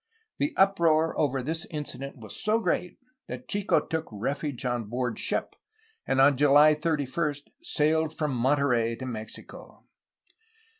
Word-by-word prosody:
The 290 +1 0
uproar 165 -5 +3
over 135 -3 0
this 160 +4 -2
incident 140 -3 -5
was 110 -4 -9
so 215 +2 +1
great 180 -3 -1 0.3
that 250 - -7
Chico 205 -1 +1
took 160 -1 -3
refuge 135 +5 -3
on 120 -2 -1
board 125 +2 -3
ship, - - -1 0.5
and 135 - +1
on 135 0 +6
July 145 +2 +6
31 150 -1 -1 0.3
sailed 160 - 0
from 150 -3 -1
Monterey 125 -3 +2
to 130 - -7
Mexico. 110 -3 -9
145 Hz, 135 wpm, -27 LUFS, 130-160 Hz, 0.5 s, on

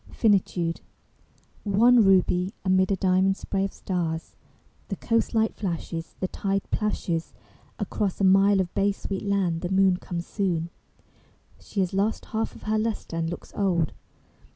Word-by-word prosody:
FINITUDE 185 -6 +1 0.8
I 210 - -5
One 230 +4 +6
ruby, 185 0 +3
amid 185 0 +3
a - - +3
diamond 190 +1 +2
spray 195 -1 -2
of 195 - -2
stars, 165 -3 -3 0.5
The - - -3
coast 230 0 0
light 220 0 +2
flashes; 170 -3 -4
The 185 - -1
tide 195 +1 -2
plashes, 175 -6 -2 0.4
Across 200 -4 -2
a - - 0
mile 195 +1 +5
of 180 -2 -1
bay 200 0 +2
sweet 195 -1 -5
land 190 -5 0
the 175 - -3
moon 190 -1 +4
Comes 175 -1 -5
soon: 170 -5 -1 0.9
She 200 - -3
has 185 -1 -1
lost 200 +3 0
half 220 +1 -1
of - - -13
her 215 0 0
lustre 220 -6 -3
and 165 0 -1
looks 175 - -8
old. 175 -6 +1
190 Hz, 155 wpm, -26 LUFS, 175-205 Hz, 0.9 s, One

